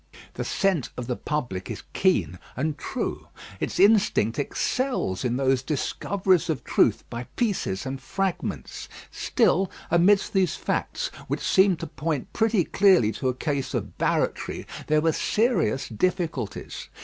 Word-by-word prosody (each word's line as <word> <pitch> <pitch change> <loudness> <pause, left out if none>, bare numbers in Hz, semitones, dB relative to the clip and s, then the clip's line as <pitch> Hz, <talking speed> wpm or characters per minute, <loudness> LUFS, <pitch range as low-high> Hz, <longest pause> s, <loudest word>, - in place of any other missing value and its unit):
The - - -3
scent 190 - 0
of 125 - -4
the 125 0 -2
public 120 -13 -3
is - - -6
keen 185 - +1 0.2
and 150 +3 -1
true. - - -4 0.3
Its - - -3
instinct 195 - +4
excels 145 - -1
in 125 0 0
those 135 -1 +2
discoveries 185 +6 0
of 155 -5 -1
truth - - +2
by 120 +1 -5
pieces 195 - -1
and 135 0 -4
fragments. 190 +5 -3 0.2
Still, 190 +1 +2 0.2
amidst 195 +5 +4
these 190 -2 +2
facts, - - -2 0.2
which - - -2
seemed 190 -2 +4
to - - -2
point 150 -2 -3
pretty 225 -4 +2
clearly 185 - +4
to 130 +3 -1
a 125 - -2
case 140 -1 -2
of - - -3
barratry, - - 0 0.2
there 155 0 +3
were 165 +1 +3
serious 215 - +1
difficulties. 155 - -2
160 Hz, 140 wpm, -25 LUFS, 130-195 Hz, 0.3 s, instinct